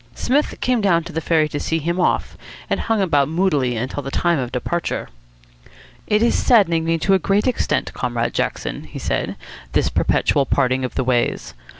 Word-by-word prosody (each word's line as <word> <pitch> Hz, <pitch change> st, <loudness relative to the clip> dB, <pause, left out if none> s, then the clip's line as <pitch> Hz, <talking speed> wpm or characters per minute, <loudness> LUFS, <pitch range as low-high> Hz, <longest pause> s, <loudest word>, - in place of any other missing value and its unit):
Psmith 290 Hz, +4 st, 0 dB
came 250 Hz, -3 st, +1 dB
down 170 Hz, -5 st, +2 dB
to 170 Hz, +1 st, -9 dB
the 160 Hz, -, -2 dB
ferry 155 Hz, -1 st, +2 dB
to 145 Hz, -, -3 dB
see 160 Hz, -, -1 dB
him 170 Hz, +3 st, -2 dB
off, -, -, 0 dB, 0.4 s
and -, -, +1 dB
hung 225 Hz, -3 st, 0 dB
about 145 Hz, -6 st, +2 dB
moodily 150 Hz, -8 st, +1 dB
until 130 Hz, +5 st, -3 dB
the 135 Hz, -, -6 dB
time 170 Hz, +2 st, +1 dB
of 125 Hz, -2 st, -3 dB
departure. 170 Hz, +7 st, -3 dB, 1.0 s
"It 210 Hz, +1 st, +2 dB
is 235 Hz, -, +3 dB
saddening 170 Hz, -9 st, +3 dB
me 165 Hz, 0 st, +1 dB
to 195 Hz, +4 st, +1 dB
a 190 Hz, -, +4 dB
great 195 Hz, +4 st, +1 dB
extent, 255 Hz, -, 0 dB
Comrade -, -, -2 dB
Jackson," -, -, -3 dB
he -, -, -10 dB
said, -, -, -2 dB, 0.4 s
"this -, -, +2 dB
perpetual 140 Hz, -3 st, +1 dB
parting 130 Hz, 0 st, +1 dB
of 130 Hz, -, -4 dB
the -, -, 0 dB
ways. 125 Hz, -1 st, 0 dB
165 Hz, 190 wpm, -20 LUFS, 140-195 Hz, 1.0 s, a